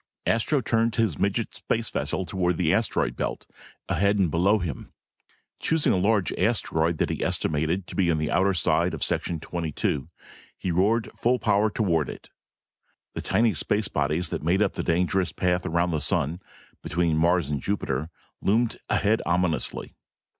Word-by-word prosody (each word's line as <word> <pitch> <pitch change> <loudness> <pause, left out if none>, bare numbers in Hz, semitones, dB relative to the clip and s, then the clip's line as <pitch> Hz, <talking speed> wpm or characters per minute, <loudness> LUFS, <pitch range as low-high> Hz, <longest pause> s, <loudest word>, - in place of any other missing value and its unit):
Astro 130 +5 +2
turned 115 0 +1
his 110 - 0
midget - - 0
space - - -2
vessel 95 - -2
toward 90 -2 0
the 85 -3 +2
asteroid 110 -1 0
belt, - - -3 0.4
ahead 100 +4 +2
and 95 -6 +2
below 95 +7 +3
him. 85 -9 -5 0.7
Choosing 160 -2 +2
a - - +2
large 100 -1 +2
asteroid 80 +1 +1
that - - 0
he - - -3
estimated 80 +5 0
to - - -10
be 90 -3 +2
on 80 - +2
the 75 0 -1
outer 95 +4 +3
edge 85 -1 +1
of - - -3
section 85 - -1
twenty 85 0 -4
two, 70 -2 -2 0.5
he 90 - -2
roared 105 +6 +1
full 125 +2 +2
power 105 -1 +2
toward 85 -8 0
it. - - -10 0.8
The - - -4
tiny 115 -1 +2
space 105 +6 -1
bodies 75 +5 -1
that - - -3
made 90 +6 +2
up 100 - 0
the - - -3
dangerous 90 +2 +1
path 90 0 0
around 85 +2 +1
the 80 -2 -1
sun, 80 +5 0 0.4
between 85 0 0
Mars 85 -1 +2
and 70 -2 -2
Jupiter, 75 -6 -2 0.3
loomed 115 +3 +1
ahead 105 +1 +2
ominously. 90 -1 -1
90 Hz, 170 wpm, -25 LUFS, 80-105 Hz, 0.8 s, below